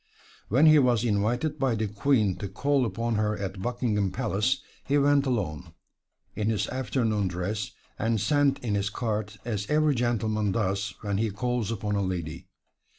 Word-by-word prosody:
When 135 +9 +5
he 155 -1 +8
was 125 -4 +3
invited 120 +8 0
by 130 -4 +2
the 110 0 -1
Queen 105 -2 +2
to 100 - -4
call 140 +5 +1
upon 115 +2 -2
her 105 0 0
at 95 -1 -5
Buckingham 110 -3 0
Palace, 110 +2 0 0.2
he 145 - +1
went 145 0 +3
alone, 90 - -2 0.6
in 105 0 0
his 110 -2 0
afternoon 115 -5 0
dress, 90 +3 -3 0.3
and 115 0 +1
sent 145 +3 +2
in 110 -4 -1
his 100 -1 0
card 105 -1 -2
as 105 -4 -3
every 150 0 +3
gentleman 110 -4 0
does 100 -2 -1
when 100 -2 -1
he 110 0 +1
calls 120 +1 -2
upon 105 -2 -2
a 100 - +1
lady. 85 -3 -4
110 Hz, 165 wpm, -27 LUFS, 100-125 Hz, 0.6 s, he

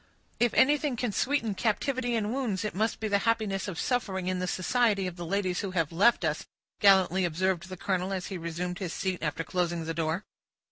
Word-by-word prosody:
"If 240 -1 +3
anything 290 -1 +3
can 240 -1 -1
sweeten 235 -1 0
captivity 240 +5 0
and 215 0 -1
wounds, 225 -7 -1
it 210 - -2
must 220 +4 0
be 220 - -2
the 200 -1 +2
happiness 210 -4 0
of 180 -5 -5
suffering 195 -7 -1
in 185 0 -1
the 185 - -2
society 205 +2 +1
of 180 -2 -4
the 175 -1 -6
ladies 185 -1 0
who 200 - -2
have 165 -2 +1
left 195 +2 +4
us," 155 -1 -2 0.3
gallantly 190 -2 +5
observed 185 +2 0
the 185 - -7
colonel, 185 +1 -1
as 185 -2 -2
he 190 - -5
resumed 175 +2 -4
his 180 -3 -4
seat 185 -2 -2
after 155 +1 -2
closing 175 -2 -1
the 165 - -2
door. 165 +4 -1
190 Hz, 205 wpm, -29 LUFS, 180-220 Hz, 0.3 s, gallantly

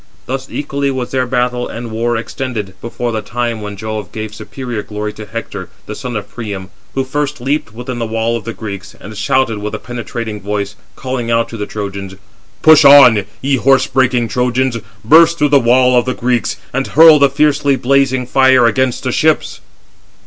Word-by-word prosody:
Thus 130 +1 -4
equally 140 -1 -2
was 130 -2 -3
their 130 -1 0
battle 125 0 -1
and 115 -1 -7
war 115 +1 -1
extended, 115 -4 -5
before 120 +1 -4
the 110 -1 -2
time 115 0 -3
when 105 -1 -7
Jove 110 -2 -5
gave 110 -1 -6
superior 120 0 -6
glory 105 0 -5
to 110 -1 -10
Hector, 100 -3 -6 0.2
the 105 - -6
son 125 +2 -6
of 105 -2 -4
Priam, 100 -4 -7 0.2
who 135 - +1
first 145 +2 -3
leaped 135 0 -2
within 125 +2 -6
the 115 - -2
wall 115 +1 -1
of 115 - -5
the 115 - -5
Greeks, 100 -3 -8
and 105 +1 -10
shouted 110 +1 0
with 105 +1 -4
a - - -3
penetrating 115 -3 -6
voice, 100 0 -3 0.2
calling 130 -3 -4
out 115 0 +1
to 115 - -7
the 105 - -4
Trojans: 100 -2 -6 0.5
"Push 155 -1 +7
on, 125 -8 +7 0.2
ye 135 0 +2
horse 135 +1 +3
breaking 125 -3 +1
Trojans, 125 +1 0 0.3
burst 165 +6 +6
through 150 -2 +2
the 140 -1 +5
wall 125 +1 +3
of 120 - +3
the 130 - -2
Greeks, 125 -1 -1 0.2
and 135 +1 -1
hurl 160 -1 +7
the 140 -1 +5
fiercely 145 0 +2
blazing 130 -1 +1
fire 130 -1 +4
against 125 +2 +1
the 130 - -1
ships." 155 +4 0
120 Hz, 190 wpm, -15 LUFS, 110-130 Hz, 0.5 s, Push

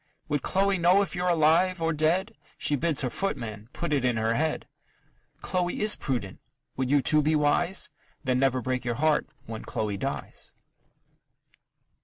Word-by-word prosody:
Would 145 -2 0
Chloe 195 +3 +1
know 180 +4 +5
if 195 - -6
you're 180 0 0
alive 170 +3 +3
or 165 0 0
dead? 160 +5 +1 0.2
She 145 - 0
bids 155 0 0
her 130 - -1
footman 115 - -4
put 170 -1 -3
it 140 -3 +1
in 125 -2 +1
her 110 +1 +1
head. 155 +5 -1 0.7
Chloe 180 -1 -1
is 210 0 +3
prudent 120 -9 -3 0.4
would 130 -1 -1
you 145 -1 +3
too 155 0 +4
be 155 +2 +2
wise? 170 +5 +2 0.3
Then 130 -2 +1
never 130 -2 +1
break 130 0 -1
your 120 -1 -2
heart 155 +3 +1 0.2
when 110 -1 -7
Chloe 105 -2 -3
dies. - - -5
150 Hz, 165 wpm, -27 LUFS, 125-175 Hz, 0.7 s, know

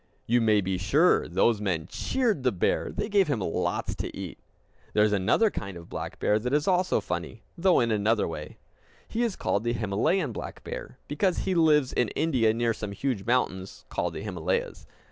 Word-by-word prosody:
You 120 +1 +3
may 110 -2 +4
be 95 -1 -2
sure 150 - +3
those 100 +5 +2
men 90 -6 -1
cheered 235 - 0
the 125 -1 +2
bear, 90 - 0
and 215 - -4
gave 200 -3 +4
him 145 -6 0
lots 90 -4 -1
to - - -5
eat. - - -7 0.6
There 105 - +5
is 105 -1 +2
another 105 - +3
kind 95 -2 -6
of 85 - -12
black - - -6
bear 105 - +2
that 125 +4 -3
is 150 +1 0
also 185 -1 +2
funny, 90 +6 -5
though 185 +1 +3
in 115 -2 +1
another 110 +1 +2
way. 75 -2 -7 0.5
He 230 - -2
is 230 -5 0
called 100 - -1
the 120 0 0
Himalayan 115 - 0
black - - -7
bear, - - -7
because 190 -4 0
he 190 - +1
lives 155 -5 +3
in 120 - +2
India 130 -9 +2
near 115 +1 +1
some 105 -2 -6
huge 115 -2 -2
mountains 95 -7 -1
called - - -2
the - - -5
Himalayas. - - -3
115 Hz, 195 wpm, -27 LUFS, 100-165 Hz, 0.6 s, There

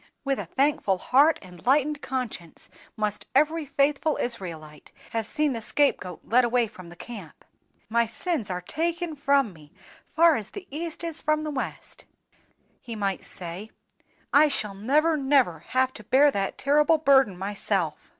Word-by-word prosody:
With 275 -1 0
a - - -4
thankful 265 -8 +1
heart 285 - +4
and 180 -2 -14
lightened 290 +3 +2
conscience 240 -11 -5 0.3
must 210 -1 -2
every 305 +2 +2
faithful 285 +2 +1
Israelite 165 -10 -4 0.2
have 225 -2 -2
seen 300 -2 0
the 230 - -4
scape 285 +5 +2
goat 180 -2 -8
led 250 +3 +3
away 240 0 +2
from 185 -5 -12
the 175 - -12
camp. 195 -5 -10 0.4
'My 235 +1 +2
sins 270 - -2
are 180 -1 -3
taken 335 - -2
from 275 -6 +2
me, 150 -2 -17 0.4
far 330 -1 +4
as 215 -1 -6
the 400 -2 -9
east 325 +3 -5
is 330 -2 -3
from 305 0 +1
the 305 - -3
west,' 270 -2 -6 0.8
he 235 - -7
might 195 -3 -2
say, 180 +4 -6 0.6
'I 300 +2 +7
shall 215 -8 -2
never, 295 +11 +2
never 265 - +2
have 260 0 +1
to 215 - -11
bear 280 +7 +4
that 195 -5 -2
terrible 300 +3 +3
burden 270 - +4
myself. 195 -4 -2
255 Hz, 160 wpm, -26 LUFS, 200-295 Hz, 0.8 s, I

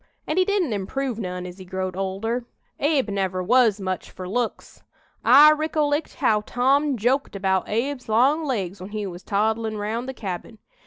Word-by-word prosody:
An' 310 - -2
he 370 - +4
didn't 385 - +1
improve 230 +5 -3
none 180 -3 -4
as 180 +1 -9
he - - -8
growed 185 0 -4
older. 200 +6 -2 0.3
Abe 285 -6 +1
never 190 -2 -1
was 225 0 +4
much 185 -1 -3
fur 185 -1 -8
looks. 235 +4 -3 0.4
I 285 +5 +8
ricollect 305 -1 0
how 215 -6 +2
Tom 270 +5 +1
joked 250 +3 0
about 190 -1 0
Abe's 250 +3 -2
long 265 +9 +3
legs 200 - -3
when 185 - -7
he 210 -1 -4
was 180 -2 -7
toddlin' 220 +2 0
round 225 +5 -3
the 265 - -6
cabin. 195 +1 -6
220 Hz, 170 wpm, -24 LUFS, 190-270 Hz, 0.4 s, I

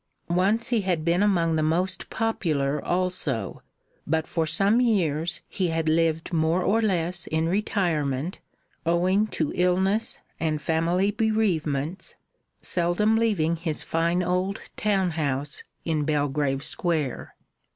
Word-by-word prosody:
Once 200 +7 +2
he 235 -3 +2
had 175 -5 -1
been 170 +2 +2
among 170 -6 +2
the 155 - +1
most 175 +4 0
popular 150 -11 -1
also, 175 - -1 0.5
but 160 +1 +1
for 165 -2 -1
some 200 +9 +3
years 175 -8 +1
he 185 - -1
had 165 -1 -1
lived 165 +1 +1
more 165 +2 +2
or 225 +3 +2
less 175 -4 0
in 160 +1 0
retirement, 170 -6 -1 0.4
owing 185 +5 +2
to 155 -7 -2
illness 190 +5 +2 0.2
and 155 -2 0
family 170 +6 +1
bereavements, 185 -8 -1 0.5
seldom 180 +5 +2
leaving 200 -8 +1
his 160 -2 -3
fine 170 +2 0
old 180 +2 -1
town 195 -4 +1
house 145 -3 -2 0.2
in 155 -3 0
Belgrave 145 -2 0
Square. 155 -5 -1
170 Hz, 125 wpm, -25 LUFS, 155-190 Hz, 0.5 s, some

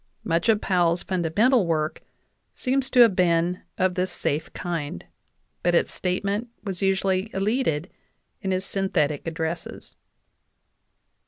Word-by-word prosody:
Much 165 +5 0
of 215 -2 +5
Powell's 175 -3 +1
fundamental 190 +5 +2
work 155 -2 -1 0.5
seems 265 0 0
to 250 - +5
have 225 -5 +6
been 175 0 +2 0.2
of 185 0 +2
this 185 +1 -1
safe 150 +3 -2
kind, 160 - -4 0.6
but 175 0 +2
its - - +2
statement 200 +5 -1 0.2
was 190 -4 -5
usually 195 +1 +1
elided 195 - 0 0.5
in 190 - -2
his 185 0 0
synthetic 165 -8 0
addresses. 165 +1 -5
185 Hz, 120 wpm, -25 LUFS, 165-195 Hz, 0.6 s, have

